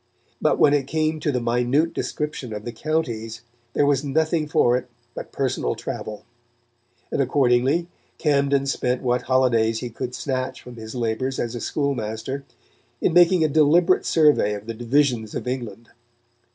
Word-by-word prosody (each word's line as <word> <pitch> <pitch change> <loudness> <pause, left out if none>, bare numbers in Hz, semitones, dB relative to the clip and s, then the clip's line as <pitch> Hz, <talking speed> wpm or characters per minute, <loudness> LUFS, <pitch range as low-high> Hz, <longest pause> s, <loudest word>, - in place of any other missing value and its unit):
But - - +2
when 145 - +5
it 140 -2 +1
came 155 +1 0
to 150 -1 0
the 125 - 0
minute 125 +7 +1
description 150 -6 -4
of 105 0 -6
the 120 - -4
counties 115 -5 -3 0.3
there 145 - +3
was 140 -1 +2
nothing 155 +2 0
for 120 -4 +3
it 125 0 -3 0.2
but - - -8
personal 125 - -1
travel; 105 0 -6 0.9
and - - +1
accordingly 135 +4 +2 0.3
Camden 140 -2 +2
spent 125 -2 -1
what 125 0 +1
holidays 120 -4 +2
he 125 - -5
could 125 +2 -5
snatch 130 -2 -3
from 125 -1 -12
his 110 +1 -8
labours 120 +2 -2
as 120 0 -2
a 120 - -5
schoolmaster 130 -2 -2 0.6
in - - +1
making 175 0 +5
a - - +4
deliberate 160 +5 +3
survey 150 -10 +3
of 100 +1 -8
the 115 - -4
divisions 120 -1 0
of - - -4
England. 120 -3 -5
130 Hz, 160 wpm, -23 LUFS, 120-150 Hz, 0.9 s, when